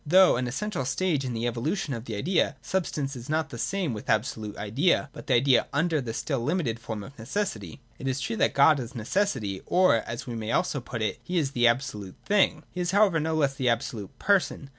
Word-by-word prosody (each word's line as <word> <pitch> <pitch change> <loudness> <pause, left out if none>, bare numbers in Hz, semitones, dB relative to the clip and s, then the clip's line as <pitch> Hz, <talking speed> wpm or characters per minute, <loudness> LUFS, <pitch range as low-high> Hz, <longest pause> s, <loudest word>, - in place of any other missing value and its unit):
Though 185 +4 +6
an 125 +1 -1
essential 180 - -2
stage 150 +2 0
in 125 -2 -3
the 115 +1 -2
evolution 140 - -1
of 115 -1 -6
the 110 - -4
idea, 165 - +1
substance 145 -4 -2
is 125 +2 -9
not 155 0 0
the 120 - -7
same 175 - -1
with 105 - -7
abso 110 +2 +1
lute 105 -2 -7
Idea, 140 - +1
but - - -11
the - - +3
idea 125 +1 +4
under 160 +1 +1
the 120 -3 -4
still 135 +4 -2
limited 130 -3 -1
form 110 -3 -5
of 135 - -11
neces 180 - -2
sity. 95 -7 -10 0.2
It 135 - -4
is 130 +1 0
true 120 - -2
that - - +2
God 140 +1 +6
is 125 +1 -7
necessity, 115 - -1
or, 185 -8 +4
as 115 +2 -5
we 120 - -5
may 110 -1 -3
also 150 -6 0
put 120 -2 -4
it, 110 - -1
that - - -32
He 180 - -1
is 145 -5 +1
the 120 -3 +3
absolute 115 -6 -1
Thing: 195 -6 +2
He 180 - -4
is 175 - -1
however 195 -4 +4
no 160 +1 -1
less 140 -3 +2
the 130 -2 0
absolute 115 -3 -3
Person. 190 -8 +1
135 Hz, 235 wpm, -27 LUFS, 115-165 Hz, 0.2 s, Though